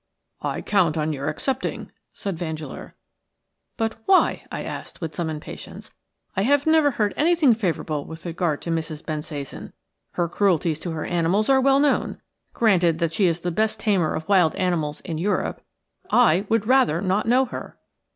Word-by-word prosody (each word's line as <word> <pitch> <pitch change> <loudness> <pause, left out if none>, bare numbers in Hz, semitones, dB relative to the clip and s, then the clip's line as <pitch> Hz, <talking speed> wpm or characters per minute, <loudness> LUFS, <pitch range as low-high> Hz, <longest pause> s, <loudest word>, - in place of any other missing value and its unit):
COUNT 175 -6 +2
on 155 0 0
your 140 -1 -4
accepting," 265 -1 -3 0.2
said 195 -3 -4
Vandeleur. 160 -2 -6 0.8
"But 225 -2 -1
why?" 380 -1 +3
I - - -4
asked, - - -7
with 160 -3 -5
some 165 -1 -2
impatience. 155 -1 -8 0.4
"I 190 - +1
have 280 +6 +3
never 315 -2 +5
heard 210 -6 0
anything 315 -4 +4
favourable 165 -8 -2
with 160 +1 -10
regard 170 -3 -1
to 170 - -3
Mrs. 160 -2 -3
Bensasan. 150 -3 -6 0.4
Her 175 - 0
cruelties 170 -4 +1
to 170 - -4
her 155 - -4
animals 175 +6 +1
are 265 -1 +5
well 275 +1 +4
known. 290 0 +1 0.3
Granted 180 -8 +3
that 165 -1 -1
she 190 +2 +3
is 165 0 -1
the 175 - -2
best 215 +5 0
tamer 190 -7 +1
of 160 - -5
wild 185 -5 +4
animals 165 -5 -1
in 160 -2 -5
Europe, 200 +5 -1 0.5
I 205 -5 +4
would 225 -1 +2
rather 255 - +3
not 195 +3 0
know 255 +3 +4
her." 255 - -8
180 Hz, 165 wpm, -23 LUFS, 160-225 Hz, 0.8 s, never